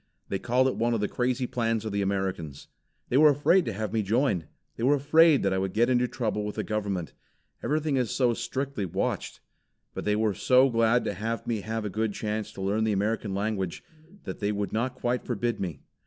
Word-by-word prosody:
They 95 - -1
called 125 +4 +2
it 130 - -1
one 120 +1 +1
of - - -1
the 105 - 0
crazy 125 +3 -1
plans 115 -2 -1
of 110 - -3
the 100 0 0
Americans. 95 -7 -3 0.4
They 125 - +2
were 155 +1 +8
afraid 150 +5 +3
to 115 - -2
have 110 +2 -4
me 110 - +2
join. 105 - +1 0.3
They - - -8
were 135 +5 +4
afraid 155 +2 +5
that 95 -1 +2
I 95 - +1
would 95 -1 -2
get 120 +3 +3
into 125 0 +3
trouble 110 -4 -2
with 105 0 -4
the - - -2
government. 100 -5 -3 0.5
Everything 150 -1 0
is 125 -3 0
so 125 -3 +2
strictly 125 0 -3
watched. - - -3 0.5
But - - -5
they 105 - +2
were 110 -1 +1
so 130 +6 +4
glad 115 +1 +3
to - - -1
have 110 +3 -3
me 115 -3 -1
have 110 +1 -3
a - - -2
good 110 +1 -1
chance 105 0 -3
to 95 - -6
learn 105 +3 +1
the 110 -1 +1
American 105 0 -1
language, 100 -3 -2 0.4
that - - -6
they 105 0 0
would 100 -1 -3
not 120 +4 -1
quite 125 +1 -1
forbid 120 0 -2
me. 85 -8 -4
110 Hz, 220 wpm, -27 LUFS, 100-125 Hz, 0.5 s, were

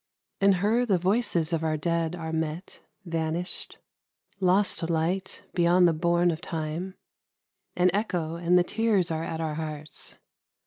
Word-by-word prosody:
In 195 0 +5
her 210 +6 +2
the 205 -6 +2
voices 180 -3 +1
of 160 -1 0
our 155 -1 0
dead 165 +1 -1
are 160 -2 -5
met, 160 +2 -3 0.3
Vanished, 165 +1 -3 0.6
lost 185 -2 +2
light, 170 +4 -1
beyond 175 0 +4
the 170 - +3
bourne 170 +2 +2
of 160 0 -5
Time 165 +3 -4 0.8
An 180 0 +4
echo, 180 -6 -1
and 170 +1 +3
the 180 - +5
tears 210 -4 +1
are 160 0 -2
at 160 -1 -4
our 160 -2 -2
hearts. 155 -1 -6
170 Hz, 145 wpm, -27 LUFS, 160-185 Hz, 0.8 s, In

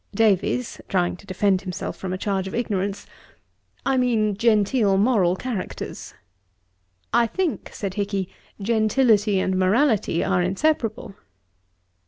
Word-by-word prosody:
DAVIES 220 +3 +1
(trying 180 -2 +1
to 200 - -17
defend 190 0 +1
himself 185 -3 -5
from 190 - -5
a 185 - -2
charge 190 -1 -2
of - - -5
ignorance,) 200 -4 -2 0.8
'I 270 -1 +2
mean 225 -5 +1
genteel 210 -1 +2
moral 195 -5 +3
characters.' 225 -2 -6 1.0
'I 235 0 +4
think 360 - -2
(said 195 -3 -4
Hicky,) 200 -2 -2 0.3
gentility 215 -1 +2
and 185 0 0
morality 210 - +2
are 190 -2 +1
inseparable.' 220 - -1
205 Hz, 120 wpm, -23 LUFS, 190-230 Hz, 1.0 s, I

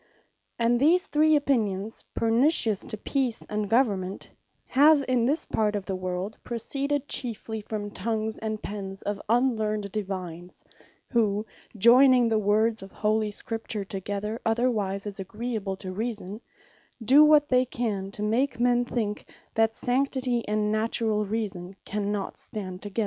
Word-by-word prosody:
And 235 +1 +2
these 335 +7 +4
three 310 +1 +3
opinions, 225 -8 0
pernicious 230 - +3
to 215 - -2
Peace 255 +1 -2
and 210 -1 -2
Government, 200 -6 0 0.4
have 290 +1 +5
in 245 -2 +2
this 295 +5 0
part 210 -1 0
of 200 -2 -3
the 190 - -3
world, 185 +3 -4
proceeded 275 +4 -2
chiefly 220 -4 -4
from 205 0 -5
the - - -18
tongues, 220 +2 -2
and 215 -1 -3
pens 195 -1 -6
of 205 -1 -3
unlearned 220 -4 +1
Divines; 185 -4 -6 0.5
who 215 -3 +1 0.3
joyning 245 +2 +6
the 220 -1 +2
words 215 +2 +2
of 195 0 -10
Holy 215 0 0
Scripture 220 -1 -4
together, 205 +3 -4
otherwise 225 -4 0
than 205 - -4
is 195 - -10
agreeable 210 0 -4
to 185 -1 -6
reason, 210 0 -4 0.6
do 275 +6 +8
what 300 -1 +5
they 255 0 +4
can, 215 -6 -3
to 205 +1 -6
make 235 +5 0
men 245 0 +3
think, 215 -4 -3 0.2
that 225 0 +2
Sanctity 255 -1 0
and 210 0 0
Naturall 215 -1 0
Reason, 195 -4 -4
cannot 205 -1 -3
stand 185 -3 -6
together. 205 +2 -5
220 Hz, 145 wpm, -26 LUFS, 205-245 Hz, 0.6 s, do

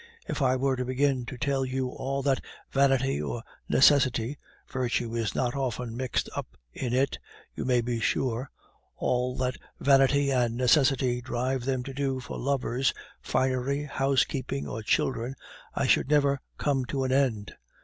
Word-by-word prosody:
If - - -3
I 130 -1 +3
were 135 +1 +1
to 125 - -1
begin 130 -1 0
to 125 - -6
tell 135 +1 0
you 130 0 -2
all 135 +2 -3
that 135 -1 +2 0.3
vanity 135 - +2
or 115 +11 -4 0.3
necessity 135 -2 +4 0.3
(virtue 120 -2 -1
is 115 -2 -1
not 125 0 0
often 125 -3 -2
mixed 130 0 -1
up - - -6 0.2
in 125 - -3
it, 130 +2 +1 0.3
you - - -4
may 125 -2 +3
be 120 0 -2
sure), 125 +2 0 0.5
all 125 0 0
that 130 0 -1 0.2
vanity 140 0 +4
and 120 -3 +1
necessity 130 -1 +3
drive 125 +1 -2
them 130 -2 0
to 135 - -7
do 135 -1 -1
for 125 - -7
lovers, 135 -1 0 0.3
finery, 130 +2 0
housekeeping, 135 -1 0
or 110 - -4
children, 120 +3 0 0.4
I - - +1
should - - +3
never 140 -2 +3 0.2
come 140 -3 +1
to 135 +1 -2
an 130 - -1
end. 125 -7 +1
130 Hz, 160 wpm, -28 LUFS, 125-135 Hz, 0.5 s, necessity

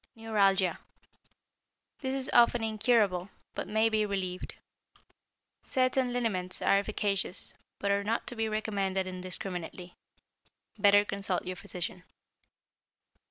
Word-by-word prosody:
=Neuralgia.= 200 -5 +2 1.2
This 265 -1 -1
is 265 -1 -1
often 240 -1 +5
incurable, 215 -4 +2 0.2
but - - -4
may 220 +1 +3
be 220 -1 +2
relieved. 190 -3 -3 1.1
Certain 255 -1 +1
liniments 205 -7 -1
are 195 - +4
efficacious, 200 -2 -2 0.2
but 200 - 0
are 200 0 +2
not 225 +3 -1
to 245 - -5
be 225 -1 -1
recommended 200 -3 -1
indiscriminately. 180 -1 -6 0.8
Better 205 0 +6
consult 195 -2 -2
your 185 - -3
physician. 180 0 -5
200 Hz, 110 wpm, -30 LUFS, 185-225 Hz, 1.2 s, Better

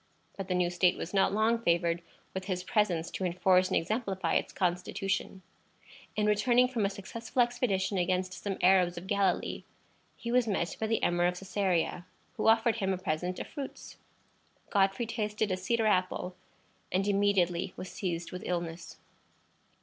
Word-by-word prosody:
But 195 -1 -5
the 180 - 0
new 180 -1 +1
state 180 0 +3
was 180 - -6
not 195 -1 +3
long 220 +3 +2
favored 170 -3 +1 0.3
with 190 0 -4
his 185 -2 -2
presence 180 -5 +1
to - - -4
enforce 185 +1 +3
and - - +1
exemplify 190 -3 -1
its - - +1
constitution. 185 +1 -2 0.7
In 210 - +1
returning 240 +4 +4
from 230 -6 0
a - - -2
successful 225 +5 -1
expedition 210 -6 0
against 185 +1 0
some 195 0 -4
Arabs 180 -1 +4
of 170 - -6
Galilee, 200 0 0 0.5
he 235 - -4
was 245 -1 +3
met 190 -5 -1
by 220 - -1
the 225 0 0
Emir 175 0 +3
of 180 - -1
Cæsarea, 185 -2 -1 0.3
who - - -1
offered 225 +1 +4
him 195 -3 0
a - - -2
present 180 0 -2
of - - -4
fruits. 280 -3 -8 0.7
Godfrey 195 +2 +2
tasted 215 -2 -2
a - - +2
cedar 225 +5 0
apple, 185 -2 0 0.6
and 190 +2 +1
immediately 195 -4 +2
was 185 - -6
seized 175 -2 -3
with 180 - -6
illness. 170 -1 -4
190 Hz, 165 wpm, -30 LUFS, 180-210 Hz, 0.7 s, returning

